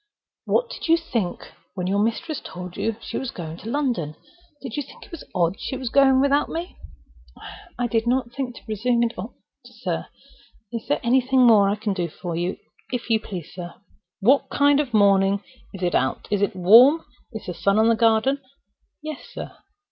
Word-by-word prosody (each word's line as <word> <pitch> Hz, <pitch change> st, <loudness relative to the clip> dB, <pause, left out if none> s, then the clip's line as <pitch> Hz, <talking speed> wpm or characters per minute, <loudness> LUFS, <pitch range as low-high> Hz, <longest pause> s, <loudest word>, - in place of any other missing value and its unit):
"What -, -, +1 dB
did -, -, -6 dB
you 330 Hz, +1 st, +5 dB
think 230 Hz, -, -3 dB, 0.2 s
when 180 Hz, -2 st, -3 dB
your 195 Hz, +2 st, +1 dB
mistress 250 Hz, +9 st, -1 dB
told 180 Hz, +1 st, -8 dB
you 225 Hz, -1 st, -1 dB
she -, -, -4 dB
was 265 Hz, -, -4 dB
going 165 Hz, -5 st, -7 dB
to 220 Hz, -, -8 dB
London? 235 Hz, -, -1 dB, 0.4 s
Did 260 Hz, -5 st, -7 dB
you 290 Hz, -, -1 dB
think 275 Hz, -, -12 dB
it 335 Hz, -, -7 dB
odd 175 Hz, +2 st, +1 dB
she 265 Hz, -, -4 dB
was 255 Hz, -2 st, -4 dB
going 270 Hz, -1 st, +5 dB
without 280 Hz, +1 st, +2 dB
me?" 340 Hz, +3 st, -5 dB, 1.0 s
"I 245 Hz, -, 0 dB
did 230 Hz, -1 st, 0 dB
not 250 Hz, -1 st, +1 dB
presume 255 Hz, -1 st, -4 dB, 0.5 s
to 235 Hz, -, +2 dB
think -, -, -9 dB
it -, -, -21 dB
odd, 205 Hz, +7 st, -7 dB, 0.3 s
sir.—Is 225 Hz, +1 st, -8 dB
there 290 Hz, -, 0 dB
anything 260 Hz, +2 st, +3 dB
more 210 Hz, -4 st, +6 dB
I 200 Hz, -, +1 dB
can 210 Hz, -1 st, -2 dB
do 175 Hz, -3 st, -2 dB
for 175 Hz, +2 st, -6 dB
you, 175 Hz, +2 st, -2 dB, 0.3 s
if 245 Hz, -2 st, -3 dB
you 220 Hz, -, +4 dB
please, 185 Hz, -7 st, -8 dB
sir?" 175 Hz, -2 st, -8 dB, 0.5 s
"What 265 Hz, +8 st, +3 dB
sort 285 Hz, 0 st, +4 dB
of 285 Hz, -4 st, -1 dB
a 220 Hz, -, +3 dB
morning 195 Hz, 0 st, +4 dB, 0.3 s
is 190 Hz, -2 st, -8 dB
it 175 Hz, -, +1 dB
out? 130 Hz, -, 0 dB
Is 205 Hz, -1 st, +1 dB
it 200 Hz, -, 0 dB
warm? 235 Hz, -, +7 dB, 0.3 s
Is 220 Hz, -, -7 dB
the 180 Hz, -, -4 dB
sun 200 Hz, +4 st, +1 dB
on 220 Hz, +1 st, +4 dB
the 230 Hz, -, +4 dB
garden?" 230 Hz, +5 st, +2 dB, 0.6 s
"Yes, 310 Hz, -2 st, -6 dB
sir." -, -, -7 dB
225 Hz, 195 wpm, -23 LUFS, 195-265 Hz, 1.0 s, warm